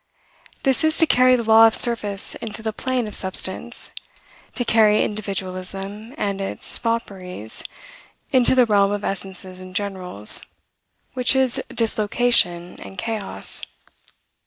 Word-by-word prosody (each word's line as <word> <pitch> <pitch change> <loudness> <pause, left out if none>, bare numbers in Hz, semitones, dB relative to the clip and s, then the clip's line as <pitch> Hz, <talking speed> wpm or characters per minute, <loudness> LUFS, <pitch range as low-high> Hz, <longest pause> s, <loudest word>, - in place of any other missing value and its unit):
This 270 +3 +1
is 315 0 +1
to 325 - +7
carry 255 -3 +4
the 240 - -2
law 225 0 +6
of 225 - 0
surface 210 -4 +1
into 220 0 -7
the 220 -1 -3
plane 255 +1 -2
of 210 - -8
substance, 190 +5 -1 0.6
to 245 - -1
carry 215 -2 +3
individualism 195 +2 -4
and 200 -5 -3
its 195 - 0
fopperies 190 - -4 0.7
into 260 -1 +4
the 250 -1 +5
realm 200 -2 +2
of 205 0 -3
essences 190 -1 -5
and 185 0 -12
generals, 185 - +3 0.7
which 250 +1 +2
is 260 -2 +1
dislocation 210 -5 +1
and 195 - -11
chaos. 220 -1 -4
210 Hz, 130 wpm, -21 LUFS, 195-235 Hz, 0.7 s, to